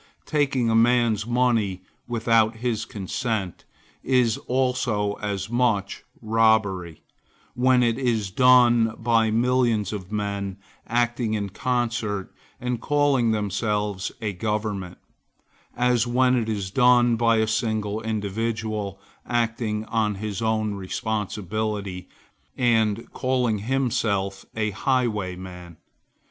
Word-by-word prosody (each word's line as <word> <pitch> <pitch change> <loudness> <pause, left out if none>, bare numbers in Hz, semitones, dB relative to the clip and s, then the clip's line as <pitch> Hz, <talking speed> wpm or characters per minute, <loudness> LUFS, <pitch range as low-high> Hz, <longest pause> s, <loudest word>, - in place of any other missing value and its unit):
Taking 140 -5 +1
a 115 - +2
man's 115 -2 +3
money 115 -6 +1 0.2
without 115 -1 +2
his 115 -1 -2
consent, 105 -2 -3 0.4
is 125 -4 +2
also 125 -5 0
as 100 -2 -3
much 110 -5 0 0.2
robbery, 110 -7 +1 0.5
when 125 0 +3
it 120 +1 +1
is 115 -7 0
done 120 -1 +5
by 115 -1 +2
millions 115 -2 +1
of 95 -2 -7
men, 100 -2 -3 0.3
acting 120 -1 0
in 100 -2 -2
concert, 110 -3 -2 0.3
and 125 -2 -3
calling 145 -5 +2
themselves 105 -1 -1
a 105 -2 -2
government, 105 -2 -3 0.8
as 125 -1 +2
when 125 +1 +3
it 115 -3 -1
is 100 -3 -3
done 120 0 +4
by 115 0 +3
a 110 - +3
single 110 -1 -1
individual, 110 -1 -3 0.3
acting 115 -2 -1
on 110 -2 0
his 105 +1 -4
own 110 -1 0
responsibility, 100 -1 -3 0.5
and 115 -3 +1
calling 125 -4 0
himself 105 -5 -1
a 110 -1 0
highwayman. 95 -8 -2
110 Hz, 105 wpm, -24 LUFS, 105-120 Hz, 0.8 s, done